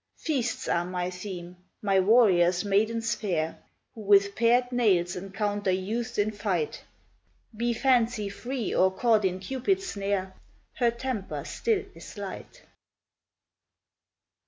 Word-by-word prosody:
Feasts 255 -7 -2
are 170 - +1
my 180 0 -3
theme, 180 -1 -7 0.2
my 195 -2 +2
warriors 185 -4 +4
maidens 220 +3 +1
fair, 165 -6 -2 0.3
Who 220 - -10
with 200 -1 +4
pared 240 +3 +3
nails 190 -8 +2
encounter 205 +2 -2
youths 220 +6 -2
in 210 +1 +2
fight; 195 -7 -2 0.7
Be 235 +2 0
Fancy 235 -3 +2
free 245 +3 -4
or 190 - +4
caught 220 +2 +2
in 185 0 0
Cupid's 270 - -1
snare, 200 - -2 0.4
Her 240 -2 +2
temper 235 -4 -4
still 445 -4 -1
is - - -12
light. - - -8
205 Hz, 120 wpm, -27 LUFS, 185-235 Hz, 0.7 s, warriors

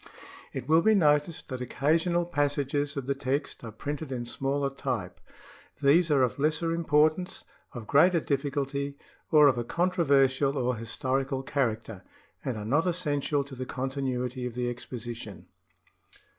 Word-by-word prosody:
It - - -6
will 160 +2 +5
be 220 +4 +4
noticed 150 -1 +2
that 130 -2 -5
occasional 165 +7 +1
passages 145 -2 -1
of 135 - -3
the 140 - 0
text 140 +1 -3
are 115 - -6
printed 145 +5 -5
in 120 -2 -3
smaller 135 +3 -1
type. 135 - -4 0.6
These 155 +5 +4
are 140 -3 +4
of 125 +2 -1
lesser 155 +3 +1
importance, 160 +2 +1 0.3
of 120 -3 -7
greater 170 - +5
difficulty, 140 -1 -2 0.3
or 150 -1 +7
of 130 -3 +3
a - - -1
controversial 140 -4 +2
or 125 -1 0
historical 130 +4 -2
character, 115 -8 -2 0.4
and 125 -4 -3
are 105 - -5
not 145 +10 +2
essential 145 -5 0
to 140 0 -12
the 130 0 -6
continuity 130 -1 -3
of 120 - -8
the 125 0 -1
exposition. 120 -3 -7
140 Hz, 145 wpm, -28 LUFS, 130-150 Hz, 0.6 s, or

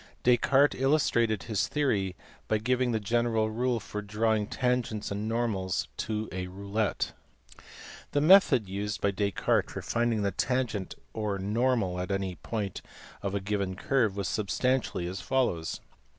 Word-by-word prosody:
Descartes 135 +3 +4
illustrated 120 - +2
his 110 -3 0
theory 105 -11 0 0.3
by 110 - +2
giving 125 +3 +1
the 110 - +1
general 115 0 +1
rule 120 +1 0
for 105 -1 -6
drawing 105 +1 0
tangents 125 -5 -1
and 105 +2 -2
normals 110 -6 -1
to 110 0 -2
a 90 0 -4
roulette. 100 +3 -2 1.0
The 145 - +1
method 155 - +6
used 100 +2 -3
by 100 - +1
Descartes 100 0 0
to - - -3
find 115 -3 0
the 100 - +1
tangent 120 -2 -1 0.2
or 105 -2 -2
normal 105 -2 0
at 90 - -3
any 95 -1 -1
point 105 -5 -4 0.4
of 100 0 -2
a - - +1
given 100 -1 -2
curve 110 -1 +1
was 100 -2 -1
substantially 105 -1 0
as 95 +2 -4
follows. 120 -12 0
110 Hz, 145 wpm, -29 LUFS, 100-120 Hz, 1.0 s, method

